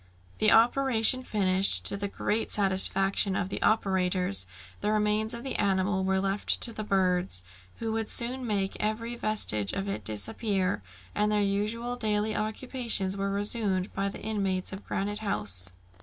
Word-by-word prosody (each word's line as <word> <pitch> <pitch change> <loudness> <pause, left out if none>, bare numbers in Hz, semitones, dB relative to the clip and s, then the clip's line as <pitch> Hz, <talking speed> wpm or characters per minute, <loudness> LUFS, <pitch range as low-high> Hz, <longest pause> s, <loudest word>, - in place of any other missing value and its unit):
The 215 - +4
operation 245 +1 +4
finished, 195 -5 +4
to - - +7
the 200 0 -3
great 215 +2 -2
satisfaction 195 0 +2
of 185 - -2
the - - -5
operators, 180 - +1 0.3
the 210 - -1
remains 215 +1 0
of 235 0 -6
the 270 - -3
animal 190 -1 0
were 190 0 +1
left 195 +1 +1
to 235 - -3
the 215 - -5
birds, 180 - 0 0.3
who 225 -1 -3
would 225 -1 -2
soon 250 +1 0
make 195 -3 -1
every 230 +3 -3
vestige 210 - +1
of 195 0 -3
it 195 - -4
disappear, 185 - -1 0.3
and 210 0 +1
their 210 -1 +2
usual 215 +5 -2
daily 215 -1 0
occupations 220 -3 -1
were 200 0 -2
resumed 200 -2 -1
by 195 0 -1
the - - -10
inmates 195 -4 -2
of 190 - -9
Granite 205 +2 -3
House. 100 - -1
205 Hz, 155 wpm, -28 LUFS, 190-220 Hz, 0.3 s, to